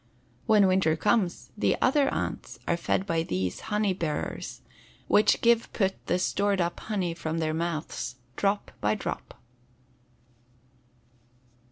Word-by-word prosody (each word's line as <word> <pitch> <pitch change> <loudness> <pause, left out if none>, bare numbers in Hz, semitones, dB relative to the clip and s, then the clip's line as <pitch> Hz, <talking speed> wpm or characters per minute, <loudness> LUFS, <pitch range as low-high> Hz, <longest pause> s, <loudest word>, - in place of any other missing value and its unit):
When 215 -3 +6
winter 185 -4 +3
comes 195 +1 0
the 210 - +1
other 275 +1 +3
ants - - -4
are 170 - +2
fed 170 +3 0
by 165 -4 +1
these 90 - -2
honey 210 -2 +2
bearers, 165 -5 -4 0.5
which 210 - +4
give 235 -1 +3
put 195 -3 0
the 180 - +2
stored 200 +2 +1
up 170 -1 -1
honey 190 -6 -2
from 160 0 -3
their 160 -1 0
mouths 160 -6 -3 0.2
drop 200 +1 0
by 105 +1 +2
drop. - - -6
185 Hz, 130 wpm, -28 LUFS, 165-205 Hz, 0.5 s, When